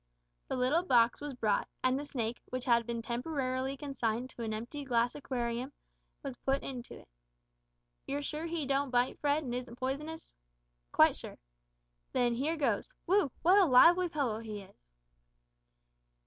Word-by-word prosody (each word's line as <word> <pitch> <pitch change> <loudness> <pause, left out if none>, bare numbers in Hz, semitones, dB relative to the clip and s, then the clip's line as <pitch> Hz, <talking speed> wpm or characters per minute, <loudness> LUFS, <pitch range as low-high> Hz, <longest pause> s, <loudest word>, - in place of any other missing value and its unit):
The - - -2
little 260 +6 +2
box 240 -9 +3
was 290 -2 -5
brought, 215 -4 +1 0.2
and 255 +1 +2
the 290 - -5
snake, 240 -4 -3
which 255 0 -5
had 235 -2 +3
been 235 -1 -3
temporarily 260 +1 -2
consigned 255 -3 -2
to - - -9
an 225 -1 -2
empty 235 +7 -5
glass 240 -2 +1
aquarium, 250 -2 -3 0.5
was 275 -3 -5
put 270 +1 0
into 250 -3 -7
it. - - -22 1.0
"You're 285 +1 -2
sure 305 +3 -4
he 330 -3 -2
don't 275 +1 +1
bite, 245 0 +1
Fred, 295 +1 +1
and 245 -3 -4
isn't 250 -1 -5
poisonous?" 300 +5 -4 0.6
"Quite - - +5
sure." - - -9 0.8
"Then 245 -1 +2
here 295 +7 -1
goes 310 - -1
whew! 370 -6 +3
what 370 +5 +6
a 390 - +6
lively 340 +6 +6
fellow 270 -9 -1
he 215 -3 -6
is!" 185 - -20
260 Hz, 160 wpm, -32 LUFS, 240-290 Hz, 1.0 s, what